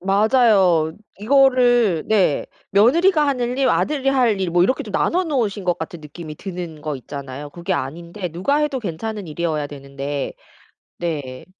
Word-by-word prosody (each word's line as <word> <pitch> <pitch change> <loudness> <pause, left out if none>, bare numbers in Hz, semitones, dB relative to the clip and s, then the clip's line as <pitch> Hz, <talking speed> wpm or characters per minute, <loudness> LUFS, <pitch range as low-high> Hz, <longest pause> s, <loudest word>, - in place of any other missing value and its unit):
맞아요. 195 -5 +3 0.3
이거를 245 - +4
네 195 -9 +2 0.3
며느리가 300 - +4
하늘 250 -2 -1
일, 265 -2 +3
아들이 275 -3 0
할 245 -6 +3
일 185 -2 -1
뭐 175 +1 +3
이렇게 255 +8 +1
좀 - - -9
나눠 365 +2 +1
놓으신 225 - -1
것 175 -1 0
같은 160 +1 -6
느낌이 155 +1 -9
드는 175 -4 -7
거 155 -2 -3
있잖아요. 140 +2 -8
그게 175 +4 -4
아닌데 170 +5 -4
누가 185 - 0
해도 295 -3 0
괜찮은 205 +2 -5
일이어야 155 -2 -2
되는데 140 0 -5 0.7
네. 145 -7 -4
185 Hz, 320 characters per minute, -21 LUFS, 155-245 Hz, 0.7 s, 이거를